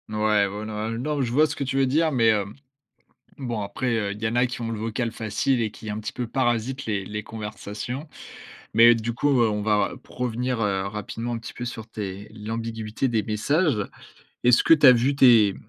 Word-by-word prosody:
Ouais, 105 -1 +2
ouais 105 +2 -6
non, 110 - -6 0.2
heu, 115 - -3
non 145 +4 -1
je 120 -3 -1
vois 150 +5 +4
ce 145 - -5
que 145 - -3
tu 135 0 -2
veux 135 - +4
dire, 155 +5 +2
mais, 115 -5 +3
hem, 105 -2 0 0.8
bon 120 -5 -3
après, 105 +6 -4
heu, 100 -2 -1
il 105 - -12
y - - +2
en 115 - -2
a 120 +1 +4
qui 125 -1 -5
ont 115 - -3
le 110 - -4
vocal 115 +2 -2
facile 110 +4 -1
et 110 - 0
qui 110 0 -9
un 105 +1 -3
petit 105 -1 -5
peu 125 -2 -4
parasitent 130 +2 -1
les 105 -3 -1
les 105 +2 -5
conversations. 110 +5 -6 0.7
Mais 115 +1 +7
du 115 +1 -2
coup, 135 +1 +2
heu, 115 - +4
on 105 0 -2
va 105 0 +1
provenir, 125 0 -3
heu, 100 -3 0
rapidement 110 +3 -5
un - - -2
petit 115 - -9
peu 120 - -6
sur 115 -2 -6
tes 100 -1 -6
l'ambiguïté 115 +2 -4
des 110 -3 0
messages. 140 - +1 0.7
Est-ce 125 -1 +6
que - - +7
tu 155 - -1
as 130 - +11
vu 125 +4 +2
tes 115 -7 +6
115 Hz, 220 wpm, -24 LUFS, 105-125 Hz, 0.8 s, as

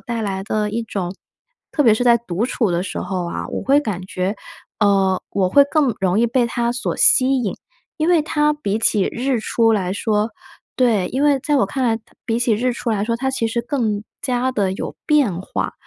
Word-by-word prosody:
带 235 -1 -4
来 195 -2 -3
的 210 +1 -1
一 230 +2 -2
种 190 -5 -4 0.6
特 295 - +2
别 225 -4 +5
是 245 - -1
在 235 -1 +5
独 215 -1 -3
处 230 -5 0
的 175 +1 0
时 190 - -5
候 180 -1 -3
啊， 85 - -4
我 - - -4
会 280 +2 +4
感 200 -9 -4
觉 185 +2 -2 0.4
呃， 195 -3 +3
我 190 -2 +1
会 280 +9 +6
更 285 -7 +2
容 190 +1 +1
易 235 - +3
被 240 +1 +1
它 235 0 -1
所 245 - -3
吸 265 +1 +4
引。 200 - -2 0.4
因 315 0 0
为 345 -3 +5
它 300 -1 +1
比 220 -9 -2
起 210 -3 +2
日 255 +1 0
出 225 +1 +2
来 190 -4 0
说 210 +1 0 0.5
对， 225 -8 +2
因 270 +3 0
为 290 -2 +4
在 290 +2 0
我 260 - +3
看 255 +7 -3
来 225 -2 +2
它 220 - -18
比 230 0 0
起 240 -1 +1
日 245 +3 0
出 235 - -3
来 210 -2 0
说， 230 +1 -1
它 265 +2 -1
其 230 -3 -1
实 235 +1 -2
更 230 -6 -1 0.2
加 255 +1 -1
地 200 -6 0
有 - - -5
变 270 - +2
化。 190 - -3
225 Hz, 235 characters per minute, -20 LUFS, 200-255 Hz, 0.6 s, 会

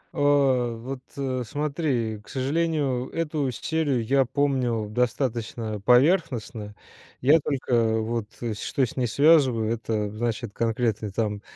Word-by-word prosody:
А. 135 -4 +3
Вот 130 +3 -6 0.5
смотри, 140 -6 -1
к - - -19
сожалению, 140 -2 -1
эту 155 -4 -1
серию 145 -1 -1
я 135 +2 +3
помнил 125 -5 0
достаточно 115 -2 -2
поверхностно. 125 - +2 0.5
Я 145 +6 +6
только 120 -6 +1
вот 115 -1 -2 0.3
что 135 - 0
с 115 - -9
ней 125 -2 +1
связываю, 130 -5 +4
это 110 -2 -2
значит 115 0 -3
конкретный 115 -2 -1
там 105 -1 -2
125 Hz, 115 wpm, -25 LUFS, 115-140 Hz, 0.5 s, Я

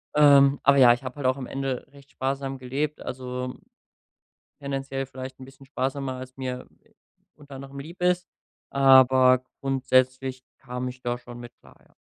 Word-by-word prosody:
Ähm, 140 -2 +6
aber 140 0 +5
ja, 125 -3 +8
ich 120 - -6
hab 130 +1 -7
halt 140 - -5
auch 130 0 +3
am 130 - -6
Ende 135 -2 -3
recht 140 -1 -18
sparsam 135 0 -3
gelebt, 135 +4 -3
also 125 0 -5 1.1
tendenziell 135 -1 -3
vielleicht 130 0 -9
'n - - -8
bisschen 135 +1 -16
sparsamer, 135 0 -3
als 130 0 -9
mir 125 -1 -5 0.7
unter 145 -2 -12
anderem 135 +1 -9
lieb 170 +5 -11
ist, 180 0 +1 0.4
aber 130 -1 +6 0.2
grundsätzlich 130 -1 0
kam 125 -1 -5
ich 125 0 -10
da 120 0 -2
schon 120 0 -11
mit 120 0 -10
klar, - - -19
ja. - - -27
130 Hz, 165 wpm, -25 LUFS, 130-140 Hz, 1.1 s, ja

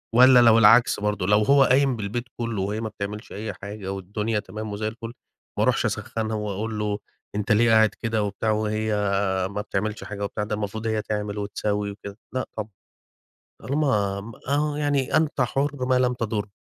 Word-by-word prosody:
والَّا 125 +1 +8
لو 115 -2 +7
العكس 115 +2 +6
برضه 105 -3 -1
لو 105 +1 +5
هو 140 +3 +5
قايم 135 0 +3
بالبيت 110 +3 -3
كلّه 115 -4 -2
وهي 105 +3 -2
ما 110 - -3
بتعملش 105 +1 -6
أي 105 +2 -5
حاجة 100 -1 -7
والدنيا 105 +3 -2
تمام 105 +2 -7
وزي 110 +1 -2
الفُل، 115 +1 -7 0.4
ما - - +2
اروحش - - +2
أسخّنها 110 -1 -2
وأقول 105 +1 -3
له: 105 -1 -1 0.4
"أنت 105 0 -1
ليه 115 +2 +4
قاعد 110 -1 +6
كده 115 -2 0
وبتاع 105 +2 -1
وهي 110 0 -1 0.6
ما 105 +1 -3
بتعملش 105 +2 -3
حاجة 100 -1 -6
وبتاع، 105 +1 -2
ده 105 0 -2
المفروض 110 +2 -4
هي 110 -1 0
تعمل 105 -1 -3
وتسوي 105 0 -2
وكده." 100 0 -10 0.2
لأ 130 - -2
طبعًا، 110 0 -4 0.9
طالما 105 -9 0
م 115 +3 -9 0.2
آه، 145 +1 +1
يعني 145 -3 0
أنت 155 -3 0
حُر 135 +1 0
ما 130 0 +3
لم 125 -1 +2
تضُر. 110 -3 -2
110 Hz, 180 wpm, -24 LUFS, 105-120 Hz, 0.9 s, والَّا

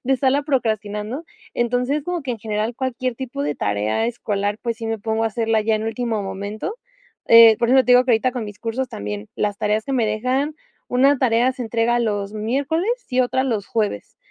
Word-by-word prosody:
de 270 - +2
estarla 270 +2 +2
procrastinando. 220 0 -2 0.3
Entonces, 250 +5 0
como 355 -3 -3
que 260 - -4
en 235 - -3
general 215 +2 -2
cualquier 255 -2 -2
tipo 245 - -5
de 145 0 -2
tarea 105 - 0
escolar. 205 -3 -2
Pues 235 -2 -2
sí, 225 0 -6
me 225 -1 -2
pongo 220 +1 -1
a - - +3
hacerla 225 0 0
ya 220 0 +1
en 215 - -1
último 225 -1 -2
momento, 200 - -5 0.5
eh, 230 -1 +9
por 235 - +1
eso 265 - +6
te 250 - +4
digo 250 +1 +6
que 250 - +2
ahorita 240 +3 +2
con 245 -3 -4
mis 205 0 -9
cursos, 245 +3 -2
también 105 - -6
las 205 -1 -1
tareas 210 +1 0
que 275 - -4
me 235 -4 +2
dejan, 255 +8 -1 0.3
una 270 +2 +3
tarea, 245 0 +3
se 255 - -6
entrega 235 +1 +1
los 205 -3 -1
miércoles 280 - -1 0.2
y 255 -1 -2
otra 255 +1 +1
los 220 -6 -1
jueves. 210 - -2
230 Hz, 205 wpm, -21 LUFS, 215-255 Hz, 0.5 s, eh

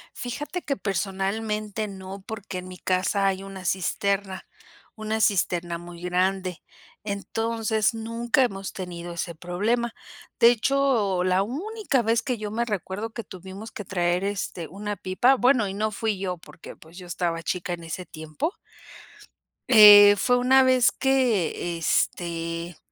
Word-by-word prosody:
Fíjate 295 +9 -5
que 280 - -2
personalmente 210 +2 -2
no, 190 0 -9
porque 205 -4 -6
en 180 - -9
mi 185 0 -9
casa 190 +2 0
hay 190 0 -1
una 195 -1 -9
cisterna, 190 +1 -1 0.5
una 220 0 -2
cisterna 175 -4 +1
muy 175 0 -11
grande. 185 0 -1 0.4
Entonces, 220 +2 -1
nunca 230 +3 0
hemos 195 -5 -3
tenido 175 -2 -6
ese 170 0 -4
problema. 215 +8 -1 0.5
De 235 0 +8
hecho 240 -7 +1
la 185 +1 +2
única 325 - -1
vez 230 +1 +2
que 250 -4 -2
yo 210 -1 -5
me 235 +2 -1
recuerdo 210 +1 -4
que 230 - -6
tuvimos 190 +3 -10
que 210 - -7
traer 175 0 0
este 190 -4 -3
una 205 +2 -5
pipa 240 +8 +3
bueno, 250 -4 +3
y 190 - -5
no 215 +2 -1
fui 215 -1 -2
yo, 185 -2 -3
porque, 165 - -13
pues, 160 +2 -17
yo 180 -2 -10
estaba 170 -1 -2
chica 175 +1 -3
en 170 -1 -7
ese 175 +3 -6
tiempo. 155 - -4 1.2
Eh, 205 -3 +10
fue 245 +3 +2
una 265 +2 +5
vez 255 -1 +4
que, 225 -10 0
este, 170 0 -1
200 Hz, 145 wpm, -25 LUFS, 180-225 Hz, 1.2 s, Eh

